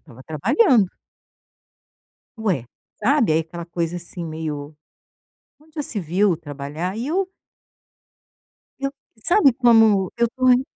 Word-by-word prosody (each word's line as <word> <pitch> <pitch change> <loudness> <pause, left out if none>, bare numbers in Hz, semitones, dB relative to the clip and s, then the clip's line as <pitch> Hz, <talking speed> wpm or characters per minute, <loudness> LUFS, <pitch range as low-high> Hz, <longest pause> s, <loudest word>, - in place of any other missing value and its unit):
estava 130 -4 -15
trabalhando". 220 - +3 1.5
Ué, 185 - -1 0.3
sabe 270 - +3
aí 160 - +3
aquela 165 +1 -6
coisa 170 0 -3
assim 175 0 -8
meio: 155 -2 -5 0.9
"Onde 315 0 -24
já 300 - -2
se 225 - -3
viu 180 +1 +1
trabalhar", 150 +7 -5
e 245 +5 -3
eu 370 +3 0 1.5
eu 275 0 -2 0.3
sabe 345 - +5
como 225 -6 +4
eu 235 - +4
estou 255 +1 +3
190 Hz, 115 wpm, -22 LUFS, 160-255 Hz, 1.5 s, sabe